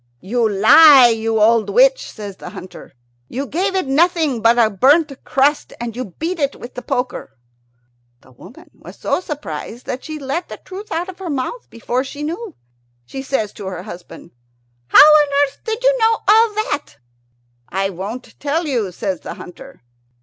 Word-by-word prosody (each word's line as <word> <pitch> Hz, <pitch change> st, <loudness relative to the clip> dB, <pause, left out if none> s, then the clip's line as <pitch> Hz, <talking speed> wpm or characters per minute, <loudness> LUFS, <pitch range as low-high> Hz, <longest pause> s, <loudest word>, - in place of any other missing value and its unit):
"You 225 Hz, -, 0 dB
lie, 250 Hz, +6 st, +7 dB
you 225 Hz, -1 st, -1 dB
old 220 Hz, 0 st, +3 dB
witch," -, -, +3 dB
says 205 Hz, -3 st, -9 dB
the -, -, -9 dB
hunter; 185 Hz, -, -11 dB, 0.4 s
"you 270 Hz, +3 st, -4 dB
gave 380 Hz, +7 st, -2 dB
it 375 Hz, -, 0 dB
nothing 305 Hz, -3 st, +1 dB
but 230 Hz, +1 st, +4 dB
a 235 Hz, -2 st, +5 dB
burnt 280 Hz, -, +3 dB
crust, 285 Hz, +2 st, 0 dB
and 235 Hz, -1 st, -5 dB
you 255 Hz, +1 st, -4 dB
beat 335 Hz, +2 st, -3 dB
it 280 Hz, -1 st, -1 dB
with 240 Hz, -, -11 dB
the 250 Hz, -, -7 dB
poker." 250 Hz, -, -4 dB, 0.8 s
The -, -, -21 dB
old 125 Hz, -, -24 dB
woman 200 Hz, +8 st, -15 dB
was -, -, -14 dB
so -, -, -1 dB
surprised 245 Hz, -, -7 dB
that 255 Hz, -, -5 dB
she 310 Hz, -1 st, -6 dB
let 280 Hz, +4 st, -4 dB
the -, -, -8 dB
truth 400 Hz, +3 st, -10 dB
out 340 Hz, +3 st, -2 dB
of 375 Hz, -1 st, -10 dB
her 370 Hz, -3 st, -6 dB
mouth 285 Hz, -, -4 dB
before 240 Hz, +2 st, -3 dB
she 285 Hz, +2 st, -8 dB
knew. 345 Hz, +5 st, -5 dB, 0.5 s
She 270 Hz, -, -7 dB
says 265 Hz, -6 st, -2 dB
to 200 Hz, -, -8 dB
her 185 Hz, -2 st, -6 dB
husband, 175 Hz, -1 st, -11 dB, 0.6 s
"How -, -, +8 dB
on 305 Hz, -1 st, +5 dB, 0.2 s
earth 280 Hz, 0 st, -13 dB
did 445 Hz, +1 st, -3 dB
you -, -, +4 dB
know 450 Hz, 0 st, +4 dB
all 440 Hz, +1 st, +5 dB
that?" 300 Hz, -9 st, -3 dB, 0.7 s
"I 195 Hz, +1 st, -1 dB
won't 200 Hz, +8 st, -8 dB
tell 305 Hz, +4 st, -1 dB
you," 235 Hz, -10 st, -2 dB
says 185 Hz, 0 st, -4 dB
the -, -, -8 dB
hunter. 180 Hz, -, -13 dB
270 Hz, 180 wpm, -18 LUFS, 225-330 Hz, 0.8 s, How